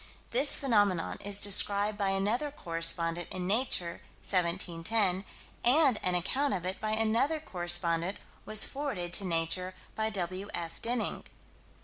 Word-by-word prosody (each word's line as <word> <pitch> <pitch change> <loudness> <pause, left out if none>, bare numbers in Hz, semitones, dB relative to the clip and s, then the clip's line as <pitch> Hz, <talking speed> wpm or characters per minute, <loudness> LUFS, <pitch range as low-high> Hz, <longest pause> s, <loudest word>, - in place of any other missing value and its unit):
This 270 +5 +4
phenomenon 205 -10 +1
is 205 0 +2
described 205 +1 +4
by 200 -1 -1
another 210 +9 0
correspondent, 165 - 0
in 185 -1 -4
Nature, 190 -5 0 0.2
17 175 -2 -1
10, 195 -2 +1 0.4
and 265 -2 +4
an 180 -1 0
account 270 +9 0
of 180 -2 -5
it 185 +2 -3
by 215 - -2
another 230 +8 +1
correspondent 175 - -1 0.3
was 215 0 +2
forwarded 240 -12 -4
to 200 - +3
Nature 175 +2 -1 0.2
by 220 0 -1
W.F. 185 -3 -5
Denning. 235 0 -2
195 Hz, 130 wpm, -30 LUFS, 175-225 Hz, 0.4 s, This